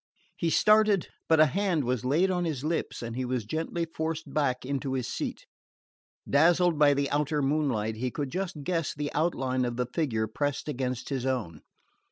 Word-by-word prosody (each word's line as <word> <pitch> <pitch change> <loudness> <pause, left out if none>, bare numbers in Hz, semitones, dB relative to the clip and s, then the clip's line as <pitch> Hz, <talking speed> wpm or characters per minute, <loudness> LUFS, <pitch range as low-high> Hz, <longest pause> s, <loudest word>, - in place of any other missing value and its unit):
He 170 - 0
started, 210 +1 +4 0.2
but 160 -1 +5
a 155 - +8
hand 180 0 0
was 125 -2 -1
laid 160 +9 +2
on 180 -1 0
his 150 -6 -2
lips 160 -5 -2
and 115 0 -5
he 130 - -2
was 125 -3 -2
gently 165 +6 -2
forced 160 -2 -4
back 130 -4 0
into 135 0 -2
his 130 -2 -2
seat. - - -4 0.8
Dazzled 170 +2 +4
by 145 -1 +6
the 140 0 +1
outer 150 0 +1
moonlight 135 -7 0
he 125 +3 -1
could 140 +1 -4
just 180 -5 -4
guess 165 -1 -1
the 145 0 -3
outline 130 -5 0
of 120 -1 -2
the 125 - 0
figure 125 -4 -1
pressed 145 +7 -2
against 130 -3 -3
his 135 -3 -2
own. 105 - -2
145 Hz, 185 wpm, -28 LUFS, 125-165 Hz, 0.8 s, a